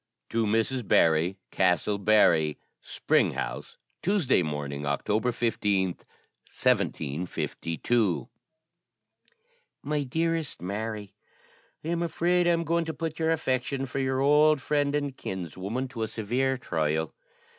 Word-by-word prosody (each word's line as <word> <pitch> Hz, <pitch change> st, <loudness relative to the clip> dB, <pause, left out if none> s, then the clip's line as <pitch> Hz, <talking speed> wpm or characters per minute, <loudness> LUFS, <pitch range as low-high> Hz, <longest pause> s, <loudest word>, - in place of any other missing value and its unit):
"TO 115 Hz, -1 st, +1 dB
MRS. 115 Hz, +2 st, 0 dB
BARRY, 80 Hz, +4 st, +3 dB
CASTLE 95 Hz, +2 st, +2 dB
BARRY. 95 Hz, -7 st, +4 dB, 0.2 s
"Spring -, -, +1 dB
House, -, -, -5 dB, 0.2 s
Tuesday 180 Hz, -, +2 dB
morning, 75 Hz, -3 st, -4 dB
October 105 Hz, +12 st, 0 dB
15th, 105 Hz, -6 st, 0 dB, 0.4 s
1752. 85 Hz, -, -1 dB, 1.6 s
"MY 150 Hz, +1 st, -1 dB
DEAREST 165 Hz, +3 st, -1 dB
MARY, 105 Hz, +2 st, -4 dB, 0.7 s
"I -, -, -4 dB
am 170 Hz, 0 st, 0 dB
afraid 175 Hz, +1 st, +1 dB
I -, -, +5 dB
am 170 Hz, 0 st, +1 dB
going 170 Hz, +1 st, 0 dB
to 160 Hz, -1 st, -4 dB
put 160 Hz, +1 st, -4 dB
your 160 Hz, 0 st, +2 dB
affection 135 Hz, -3 st, -1 dB
for 135 Hz, +1 st, -4 dB
your 130 Hz, 0 st, 0 dB
old 150 Hz, +2 st, +5 dB
friend 145 Hz, 0 st, 0 dB
and 145 Hz, -2 st, -2 dB
kinswoman 95 Hz, +8 st, -4 dB
to 120 Hz, -3 st, -6 dB
a 110 Hz, -, 0 dB
severe 125 Hz, +5 st, -1 dB
trial. 80 Hz, -8 st, -1 dB
120 Hz, 120 wpm, -27 LUFS, 95-150 Hz, 1.6 s, I